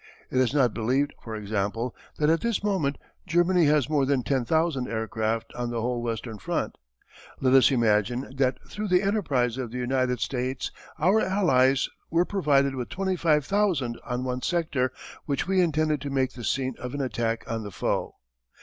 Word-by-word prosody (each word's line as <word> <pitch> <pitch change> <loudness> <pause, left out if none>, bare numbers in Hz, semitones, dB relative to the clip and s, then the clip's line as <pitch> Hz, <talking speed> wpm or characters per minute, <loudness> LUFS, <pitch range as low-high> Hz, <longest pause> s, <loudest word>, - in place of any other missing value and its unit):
It 130 - +1
is 130 -3 +3
not 130 -6 +3
believed, 130 +6 0
for 110 -2 -6
example, 105 +3 -2 0.2
that 150 - +2
at 165 +1 +3
this 235 -3 -1
moment 180 -9 0 0.3
Germany 175 0 +3
has 150 -3 +3
more 150 -2 +2
than 135 -2 +1
10,000 135 +3 +1
aircraft 110 0 -2
on 120 -1 -3
the 120 -1 -2
whole 120 +1 -1
western 115 -2 -4
front. 85 - -2 0.6
Let 130 -1 +2
us 130 -2 +7
imagine 120 +1 +1
that 130 -1 +2
through 210 0 -4
the 180 0 +3
enterprise 135 - 0
of 125 -3 -3
the 125 - -6
United 125 0 0
States 130 0 -2 0.3
our 190 +8 +3
Allies 135 -9 +3 0.2
were 170 +2 +3
provided 140 -9 +2
with 125 -2 -4
25,000 170 - +1
on 125 0 -3
one 125 0 -2
sector 150 -7 0 0.4
which 140 +2 -1
we 190 -1 +3
intended 155 -3 +1
to 140 - -4
make 130 -1 0
the 120 - -9
scene 130 +2 0
of 125 +2 -5
an 145 - -2
attack 115 -3 -1
on 115 0 -3
the 105 - -6
foe. 90 - -2
130 Hz, 175 wpm, -26 LUFS, 120-155 Hz, 0.6 s, us